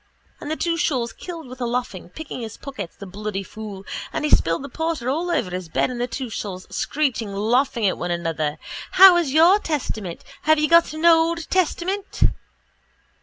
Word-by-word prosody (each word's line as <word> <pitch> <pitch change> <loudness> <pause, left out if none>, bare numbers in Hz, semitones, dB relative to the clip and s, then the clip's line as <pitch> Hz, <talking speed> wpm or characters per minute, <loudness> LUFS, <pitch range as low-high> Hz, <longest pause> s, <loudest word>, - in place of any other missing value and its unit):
And 295 - -7
the 315 - 0
two 335 +1 -1
shawls 255 -8 0
killed 335 -5 -8
with 255 +1 -10
the 245 - -1
laughing, 235 -8 -3
picking 290 - -7
his 225 -2 -7
pockets, 230 -11 -7
the 200 - -9
bloody 200 +1 -4
fool 200 -1 -9 0.3
and - - -2
he 300 - -1
spilling 165 +10 +3
the - - -5
porter 305 -3 -2
all 335 +5 -1
over 200 - 0
the 180 -2 -5
bed 205 - +1
and 240 -1 -4
the 245 - 0
two 255 +1 -4
shawls 195 -4 -6
screeching 240 -9 -1
laughing 235 +2 +1
at 190 - +1
one 175 - -3
another. 165 -3 -2 0.4
_How 370 -2 +9
is 295 -6 -3
your 335 +7 +6
testament? 220 - -4 0.2
Have 310 0 +5
you 305 0 +2
got 335 0 +5
an 315 +2 -3
old 330 0 +4
testament? 375 +2 -1
255 Hz, 190 wpm, -22 LUFS, 200-325 Hz, 0.4 s, How